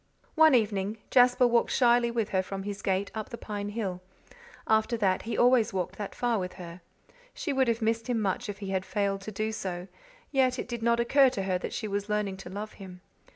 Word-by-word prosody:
One 315 -3 +6
evening 210 -2 0
Jasper 250 0 +5
walked 240 -1 +3
shyly 240 -1 +3
with 230 -3 -1
her 190 - +1
from 195 +1 -6
his 205 0 -5
gate 195 +1 -1
up 220 -1 -5
the 235 - -7
pine 205 -2 -5
hill. 200 -4 -4 0.6
After 220 +2 +2
that 190 -4 +1
he 230 - -4
always 245 -3 +4
walked 185 -2 -3
that 205 - -5
far 240 -3 0
with 180 -1 -4
her. 175 -1 -10 0.5
She 340 - -2
would 265 -1 +2
have 230 0 0
missed 225 +1 0
him 240 -2 +1
much 210 +3 -1
if 205 - -5
he 200 -2 -6
had 190 -1 0
failed 200 -1 -1
to 215 - -7
do 215 +2 -2
so; 185 -4 -5 0.4
yet 260 -2 +2
it - - -4
did 240 -2 -5
not 235 +1 +2
occur 265 +3 +5
to 240 -6 -3
her 185 -1 0
that - - -5
she 220 - -3
was 200 +1 -3
learning 210 -2 -1
to 190 -2 -9
love 205 +3 -6
him. 180 -2 -10
215 Hz, 225 wpm, -28 LUFS, 195-235 Hz, 0.6 s, One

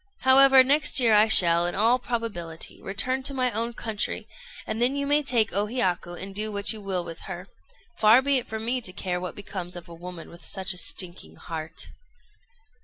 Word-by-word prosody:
However, 265 0 +6
next 285 +2 +3
year 235 -3 +3
I 210 +1 +5
shall, 170 -5 +7
in 175 - -5
all 230 +5 +2
probability, 205 -10 -5
return 255 +7 -3
to 275 +1 0
my 255 -1 0
own 230 +2 -4
country, 220 -3 -4 0.4
and 220 - -4
then 250 +3 +2
you 280 0 -2
may 290 +1 +2
take 240 -6 0
O 205 +2 0
Hiyaku 185 -7 -2
and 195 +1 -8
do 215 +2 -2
what 200 +2 -1
you 215 - -10
will 190 -3 -3
with 165 - -9
her: 180 +2 -7 0.5
far 225 +4 +5
be 280 -1 +2
it 245 - -10
from 220 0 -6
me 250 +2 -1
to 185 -5 -6
care 180 -2 -4
what 180 - -6
becomes 185 -3 -7
of 175 -1 -10
a 170 - -12
woman 175 0 -10
with 170 0 -15
such 190 +2 -2
a 180 - -3
stinking 180 -1 -2
heart." 160 -1 -6
210 Hz, 205 wpm, -25 LUFS, 180-250 Hz, 0.5 s, shall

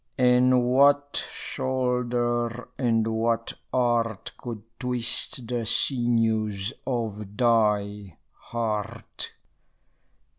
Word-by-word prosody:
And 125 0 +4
what 140 +3 +3
shoulder 125 -2 -1
and 115 -4 +2
what 115 +1 0 0.2
art 120 -4 0
Could 115 -4 -7 0.2
twist 125 0 +1
the 120 -1 -2
sinews 110 -5 +1
of 105 -5 -3
thy 105 -5 +1 0.2
heart? 110 -3 -4
120 Hz, 75 wpm, -26 LUFS, 110-125 Hz, 0.2 s, And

